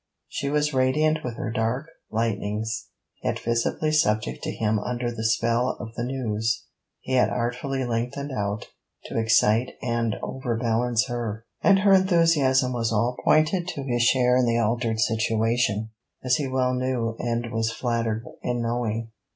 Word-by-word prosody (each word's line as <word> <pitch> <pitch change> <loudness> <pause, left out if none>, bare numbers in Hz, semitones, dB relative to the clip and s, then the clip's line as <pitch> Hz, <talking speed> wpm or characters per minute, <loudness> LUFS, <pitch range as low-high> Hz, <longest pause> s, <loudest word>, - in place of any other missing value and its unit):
She 140 - -3
was 150 0 +1
radiant 150 +4 +2
with 120 -2 -5
her 115 - -3
dark 115 +6 -1 0.2
lightnings, 110 0 -2 0.4
yet - - 0
visibly 120 +6 0
subject 105 - +1
to - - -3
him 110 -1 0
under 120 +2 -2
the 115 -1 -5
spell 115 +3 +1
of 115 -1 -7
the 120 - -3
news 115 -3 -1 0.4
he - - -7
had 125 - +4
artfully 125 +3 -2
lengthened 125 +4 -2
out 105 -3 -3 0.4
to - - -2
excite 110 +1 +3
and 115 -2 -1
overbalance 120 -1 0
her: 115 -3 -4 0.2
and 195 -1 +5
her 200 -1 +5
enthusiasm 165 -9 +4
was 115 -2 0
all 115 +3 +1
pointed 165 +3 +3
to 145 -6 -4
his 120 -3 0
share 125 0 +4
in 125 -1 +3
the 115 0 +2
altered 115 0 0
situation, 110 0 +1 0.3
as 125 -1 +3
he 145 - -2
well 130 -1 +1
knew 125 -3 -1
and 120 -1 -2
was 115 -1 0
flattered 115 -1 -1 0.2
in 120 -1 -1
knowing. 115 -1 -2
120 Hz, 155 wpm, -25 LUFS, 115-130 Hz, 0.4 s, and